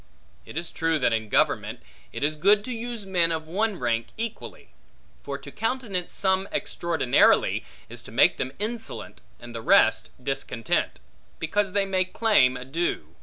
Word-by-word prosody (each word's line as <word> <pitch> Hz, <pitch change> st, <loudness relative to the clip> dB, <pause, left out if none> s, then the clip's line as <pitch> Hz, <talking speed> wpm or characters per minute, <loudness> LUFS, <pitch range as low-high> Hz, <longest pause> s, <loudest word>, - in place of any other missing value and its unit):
It -, -, -8 dB
is 170 Hz, 0 st, -3 dB
true 165 Hz, 0 st, +1 dB
that 125 Hz, -5 st, +2 dB
in 110 Hz, -1 st, -2 dB
government, -, -, +1 dB, 0.3 s
it -, -, -5 dB
is 150 Hz, +1 st, +1 dB
good 205 Hz, +6 st, +4 dB
to 255 Hz, -, -3 dB
use 230 Hz, -2 st, -5 dB
men 175 Hz, -3 st, +2 dB
of 160 Hz, -1 st, -3 dB
one 205 Hz, +4 st, 0 dB
rank 115 Hz, -2 st, -1 dB
equally: 230 Hz, -1 st, -6 dB, 0.5 s
for 140 Hz, -1 st, -5 dB
to -, -, -11 dB
countenance 215 Hz, -5 st, -2 dB
some 190 Hz, 0 st, +1 dB
extraordinarily, 165 Hz, -7 st, +2 dB, 0.2 s
is -, -, -7 dB
to -, -, -12 dB
make -, -, +4 dB
them 130 Hz, -, -3 dB
insolent, 225 Hz, +2 st, -4 dB, 0.2 s
and 120 Hz, 0 st, -10 dB
the 115 Hz, -, -5 dB
rest -, -, +4 dB
discontent; 125 Hz, -, -2 dB, 0.4 s
because 195 Hz, +4 st, -1 dB
they 200 Hz, -1 st, +2 dB
may 190 Hz, -1 st, +1 dB
claim 185 Hz, -, +3 dB
a 125 Hz, -, -8 dB
due. 135 Hz, -, -2 dB
175 Hz, 165 wpm, -26 LUFS, 135-205 Hz, 0.5 s, good